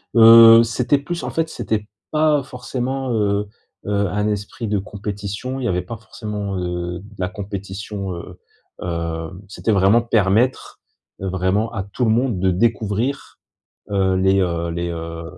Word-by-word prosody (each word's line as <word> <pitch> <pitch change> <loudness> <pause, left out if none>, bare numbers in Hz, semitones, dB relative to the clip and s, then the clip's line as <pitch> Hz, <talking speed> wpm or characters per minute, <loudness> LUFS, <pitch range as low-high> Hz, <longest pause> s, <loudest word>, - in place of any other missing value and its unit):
Heu, 115 0 +9
c'était 125 +4 +1
plus 170 +5 -5
en - - -3
fait 165 0 -1
c'était 105 -7 -3 0.2
pas 155 -2 +3
forcément, 130 0 -3
heu 105 -2 +1 0.4
heu, 100 0 +1
un 105 +3 -1
esprit 105 +2 -3
de 105 0 0
compétition. 105 +5 -5
Il - - -4
y - - 0
avait 90 -4 0
pas 95 +6 -7
forcément, 105 -2 -5
heu, 90 0 -3
de 105 +3 -15
la 90 -1 -2
compétition, 100 0 -6
heu 90 +1 -10 0.4
heu, 85 -1 -3 0.2
c'était 105 +3 -2
vraiment 100 +3 +4
permettre, 115 +2 +1 0.4
heu, 95 - -2
vraiment 95 +5 0
à 100 -5 -3
tout 100 +6 -4
le 110 - +3
monde 120 -3 +1
de 95 -1 +3
découvrir, 115 +6 -1 0.5
heu, 95 -2 +1
les, 95 +1 +3
heu 85 -2 -1
les, 85 +1 -3
heu 85 0 -5
100 Hz, 160 wpm, -21 LUFS, 95-115 Hz, 0.5 s, Heu